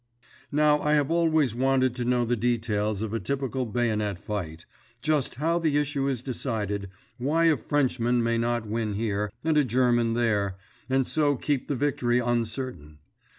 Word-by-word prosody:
Now 150 0 +3
I 150 - +1
have 145 0 +2
always 160 -7 +2
wanted 130 0 +2
to 120 - -2
know 125 0 +2
the 120 +1 +1
details 110 -3 0
of 110 -1 -4
a 115 - 0
typical 130 +3 -2
bayonet 105 -4 -1
fight—just 110 - -4
how 165 +6 +1
the 155 -3 +1
issue 145 -1 0
is 130 -3 -2
decided, 105 -6 -3 0.3
why 155 +6 +2
a 160 -2 +5
Frenchman 125 -5 +1
might 115 0 +1
not 120 -1 0
win 110 -1 -2
here, 105 -1 -1
and 155 -1 +3
a - - +4
German 120 -2 +2
there, 105 -5 +1 0.3
and 135 0 +2
so 145 0 +1
keep 140 0 -1
the 145 - -1
victory 125 -3 +1
uncertain. 120 - -2
120 Hz, 160 wpm, -26 LUFS, 110-140 Hz, 0.3 s, a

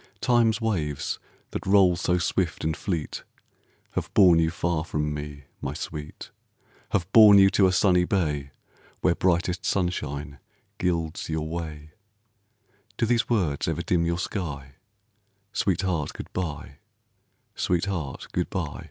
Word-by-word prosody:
Time's 120 -2 +3
waves 85 - -2 0.3
that - - -4
roll 95 -2 +5
so 90 +1 +1
swift 90 -1 -1
and 80 0 0
fleet 85 -4 -4 0.7
Have - - -3
borne 90 -5 +7
you 80 -1 +2
far 85 -1 -1
from 75 -2 -2
me, 75 -1 -7 0.2
my 70 - -4
sweet, 75 -2 -7 0.6
Have 90 -3 0
borne 105 -2 +9
you 95 0 +6
to 95 - +4
a - - +2
sunny 90 -1 +3
bay, 75 -8 -1 0.5
Where 90 - +3
brightest 90 0 0
sunshine 75 -8 -2 0.4
gilds 85 -2 -1
your 80 -1 -2
way, 80 -2 -6 1.1
Do - - +2
these 115 +1 +1
words 90 -12 0
ever 80 +1 -1
dim 85 0 +1
your 85 0 0
sky 75 -8 -5 0.8
Sweetheart, 90 -5 0
good - - -9
by, 75 -6 -4 0.8
sweetheart, 85 -5 -2
good - - -1
by? - - -4
85 Hz, 135 wpm, -26 LUFS, 75-95 Hz, 1.1 s, borne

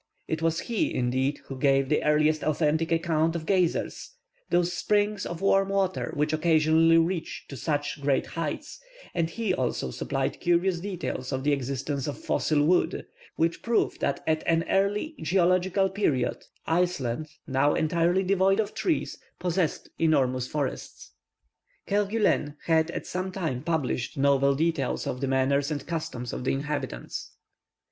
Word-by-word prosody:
It 160 0 -2
was 165 0 +1
he, 230 -3 -1
indeed, 130 +3 0
who 135 -1 -7
gave 135 -1 +3
the 150 - +1
earliest 150 0 +3
authentic 155 +2 +1
account 165 -1 +1
of 160 -2 -4
"geysers," 185 - 0 0.4
those 175 0 +2
springs 205 +3 0
of 170 +1 -6
warm 195 0 +3
water 195 -1 0
which 150 +1 0
occasionally 160 +1 +4
reach 165 +1 -1
to 140 - -7
such 145 +1 -2
great 140 -1 +1
heights, 165 - -5 0.3
and 165 -2 0
he 215 +1 -1
also 125 - -1
supplied 135 - -2
curious 175 +1 +2
details 180 -9 -4
of 130 -1 -2
the 145 - +2
existence 140 +1 -2
of 145 - -4
fossil 150 -2 +1
wood, 180 +3 +2 0.3
which 165 +1 0
prove 230 -1 0
that 140 - -1
at 155 0 +1
an 165 0 +3
early 205 +10 +1
geological 185 +2 +2
period, 160 -11 -1 0.2
Iceland, 160 -6 0 0.2
now 145 0 +2
entirely 170 +3 +2
devoid 195 +1 +3
of 215 - -1
trees, 335 -5 -1 0.2
possessed 180 -2 -1
enormous 130 -6 +2
forests. 145 -2 -4 0.7
Kerguelen 205 -7 +1
had 160 0 +3
at - - -4
the - - -13
same 185 +1 -3
time 160 -10 -3
published 150 -7 -2
novel 140 0 +3
details 155 -3 0
of 125 - -3
the 135 - 0
manners 135 +1 +2
and 145 -3 -4
customs 130 -7 -4
of - - -4
the 130 - +1
inhabitants. 140 - -4
160 Hz, 150 wpm, -27 LUFS, 140-180 Hz, 0.7 s, occasionally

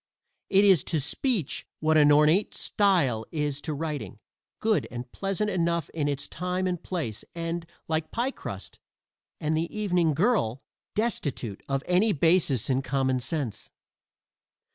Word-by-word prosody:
It 195 +1 +5
is 190 -8 +6
to 160 - 0
speech 170 - -1
what 155 0 +2
an 150 -1 +6
ornate 150 +7 +4
style 170 - +2
is 150 -3 -2
to 155 - -3
writing 145 - -4 0.4
good 220 -2 +1
and 120 0 -7
pleasant 195 +2 -1
enough 170 -2 0
in 150 -3 -1
its 140 -1 -2
time 180 +2 -2
and 180 -2 -1
place 150 - -3
and, 165 0 -3 0.2
like 160 0 -1
pie 245 +4 -1
crust - - -8 0.6
and 155 -1 0
the 165 +2 -1
evening 180 -7 +1
girl, 165 - +2 0.4
destitute 145 - -2
of 135 0 0
any 195 +4 +3
basis 160 - +3
in 130 0 +1
common 130 -1 0
sense. 130 -4 -3
160 Hz, 140 wpm, -27 LUFS, 140-185 Hz, 0.6 s, is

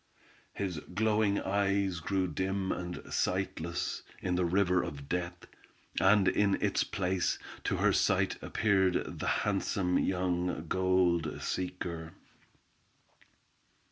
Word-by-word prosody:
His 95 -6 -3
glowing 105 +2 +1
eyes 100 -2 +1
grew 95 +3 0
dim 95 +3 -1
and 90 0 -4
sightless, 90 -2 -1 0.2
in 90 - -1
the 90 0 +2
river 90 0 +3
of 70 -3 -6
death, 90 0 -3 0.5
and 95 0 +5
in 100 -2 +3
its - - +1
place, 95 -1 0 0.3
to - - 0
her - - +3
sight - - +2
appeared 95 -4 +1
the - - -2 0.2
handsome 95 -2 +1
young 90 -2 0
gold 90 -3 +2
seeker. 90 -3 -4
95 Hz, 110 wpm, -31 LUFS, 90-95 Hz, 0.5 s, and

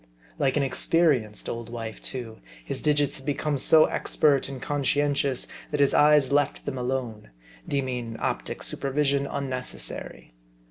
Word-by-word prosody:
Like 135 +1 +2
an 145 - +2
experienced 130 -4 +1
old 115 -1 -5
wife 115 -2 -6
too, 120 -4 -7 0.3
his - - -3
digits 145 -1 +1
had 135 - -12
become 145 0 -1
so 155 +4 +6
expert 140 -3 +1
and 135 -2 -6
conscientious, 145 -1 0 0.2
that 150 - -2
his 140 -1 +4
eyes 150 -2 +5
left 145 -1 +1
them 135 -2 -3
alone; 125 - -3 0.4
deeming 125 -4 -2
optic - - -3
supervision 140 0 0
unnecessary. 130 - -4
135 Hz, 135 wpm, -26 LUFS, 125-145 Hz, 0.4 s, so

